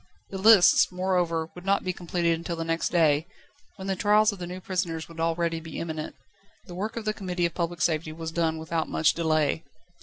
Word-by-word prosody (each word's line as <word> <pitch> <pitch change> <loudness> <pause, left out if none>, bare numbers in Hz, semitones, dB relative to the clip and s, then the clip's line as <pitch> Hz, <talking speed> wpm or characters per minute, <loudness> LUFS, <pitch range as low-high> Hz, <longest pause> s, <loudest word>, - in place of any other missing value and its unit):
The 195 - -5
lists, 205 -4 +6
moreover, 180 -3 0
would 180 - -11
not 195 +1 +1
be 185 - -2
completed 170 -1 0
until 170 +1 -4
the 165 - -3
next 165 0 -1
day, 160 -2 +3 0.5
when 190 -2 -8
the 195 - 0
trials 210 +3 +4
of 200 - -9
the 175 - -5
new 180 +1 -6
prisoners 175 -4 -3
would 165 -1 -12
already 165 0 0
be 160 -1 -9
imminent. 160 -2 -5 0.5
The 180 - -10
work 200 +5 -4
of 225 - -4
the 215 - 0
Committee 180 -4 -2
of 170 - -2
Public 170 -1 -3
Safety 155 -1 0
was 160 0 -6
done 165 -1 0
without 160 0 -3
much 155 - +2
delay. 155 -2 +1
170 Hz, 210 wpm, -26 LUFS, 165-185 Hz, 0.5 s, lists